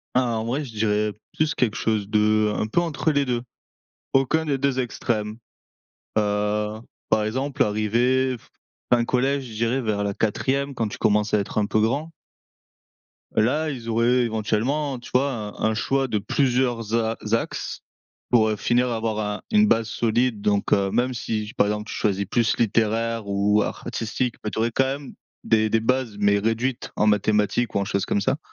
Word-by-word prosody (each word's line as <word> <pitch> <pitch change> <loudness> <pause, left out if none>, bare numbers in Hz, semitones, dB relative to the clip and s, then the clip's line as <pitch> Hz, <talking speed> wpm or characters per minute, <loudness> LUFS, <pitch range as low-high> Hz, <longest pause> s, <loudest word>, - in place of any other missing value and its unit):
En 120 -3 +1
vrai, 135 +6 -2
je 125 - -9
dirais 105 0 +1 0.2
plus 155 -1 +1
quelque 115 -4 +1
chose 110 -3 0
de 105 0 +3
un 105 - -1
peu 170 +10 +1
entre 160 -1 0
les 145 -1 +1
2. 120 -2 -1 0.7
Aucun 135 +4 +2
des 140 -2 0
2 135 -1 0
extrêmes, 110 -3 -2 0.8
heu, 105 +1 0 0.3
par 110 -1 +2
exemple, 130 +5 0
arrivé 120 +5 +1
f - - -24 0.4
fin 120 -1 +5
collège, 135 +3 +1
je 115 -3 -9
dirais 115 +4 0
vers 105 -3 -1
la 100 - -2
4e, 135 +6 0
quand 115 -3 -1
tu - - -8
commences 105 0 +2
à - - +5
être 100 +1 -3
un 105 - +2
peu 110 +1 +1
grand. 140 +9 0 1.2
Là, 145 +8 +2
ils 120 -5 -6
auraient 120 +2 +3
éventuellement, 120 +5 -1
tu - - -12
vois, 135 +3 +3
un 105 -4 -5 0.2
un - - -1
choix 135 +4 0
de 110 - 0
plusieurs 120 0 0
a 115 -1 +1
axes. 115 +2 -2 0.5
Pour, 110 -3 +4
heu, 105 - -1
finir 120 +4 +2
à 115 - -1
avoir 110 -1 -2
un 105 -1 -3
une 215 -1 +5
base 115 - +2
solide 115 -1 0
donc 100 -1 +1
heu, 100 -1 +2
même 125 +1 +1
si, 110 -2 -3
par 100 - +3
exemple, 105 0 -2
tu - - -4
choisis 100 -1 0
plus 115 +3 +1
littéraire 115 0 +1
ou 100 +1 +2
artistique. 115 +2 -3
Mais 105 - -1
tu - - -4
aurais 115 +1 +1
quand 135 - +2
même 140 +1 -4 0.3
des 110 -1 +3
des 115 +1 +3
bases, 120 -2 0
mais 100 0 +4
réduites 115 +4 -1
en 105 - +3
mathématiques 105 +2 +2
ou 100 - +3
en 100 - -1
choses 100 -1 -1
comme - - 0
ça 135 - +1
115 Hz, 185 wpm, -24 LUFS, 105-130 Hz, 1.2 s, fin